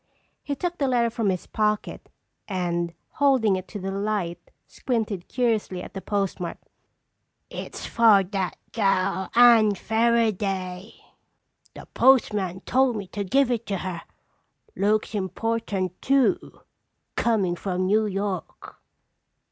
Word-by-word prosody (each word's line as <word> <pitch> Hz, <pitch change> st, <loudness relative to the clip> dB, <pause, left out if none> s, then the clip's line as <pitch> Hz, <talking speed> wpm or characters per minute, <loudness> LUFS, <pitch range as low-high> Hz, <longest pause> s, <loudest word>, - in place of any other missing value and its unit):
He 285 Hz, -, -3 dB
took 350 Hz, +5 st, -3 dB
the 280 Hz, -, +1 dB
letter 240 Hz, -2 st, +2 dB
from 225 Hz, -3 st, 0 dB
his 185 Hz, -2 st, -2 dB
pocket 210 Hz, -1 st, -2 dB, 0.4 s
and 175 Hz, -3 st, -2 dB
holding 265 Hz, -9 st, +3 dB
it 185 Hz, 0 st, -5 dB
to 205 Hz, -, -7 dB
the 195 Hz, 0 st, -4 dB
light, 195 Hz, -4 st, -3 dB, 0.2 s
squinted 220 Hz, -7 st, -3 dB
curiously 220 Hz, -7 st, -1 dB
at -, -, -10 dB
the 195 Hz, -, -6 dB
postmark. 195 Hz, -3 st, -2 dB, 0.9 s
"It's -, -, -7 dB
for 220 Hz, -4 st, +5 dB
that 190 Hz, -1 st, -3 dB
gal, 190 Hz, -3 st, 0 dB
Anne 230 Hz, -4 st, +7 dB
Fairaday. 210 Hz, -4 st, 0 dB, 0.8 s
The -, -, -10 dB
postmaster 205 Hz, -8 st, +3 dB
told 260 Hz, +1 st, +2 dB
me 205 Hz, -2 st, -4 dB
to 205 Hz, -, -3 dB
give 260 Hz, +6 st, +2 dB
it 230 Hz, -1 st, -2 dB
to 195 Hz, -, -1 dB
her. 180 Hz, -2 st, -5 dB, 0.7 s
Looks 215 Hz, +2 st, +1 dB
important 195 Hz, -1 st, -2 dB
too, 275 Hz, +6 st, +1 dB, 0.5 s
comin' 205 Hz, -7 st, +1 dB
from 185 Hz, 0 st, -2 dB
New 215 Hz, +3 st, +2 dB
York." 195 Hz, -2 st, -5 dB
205 Hz, 125 wpm, -25 LUFS, 185-230 Hz, 0.9 s, Anne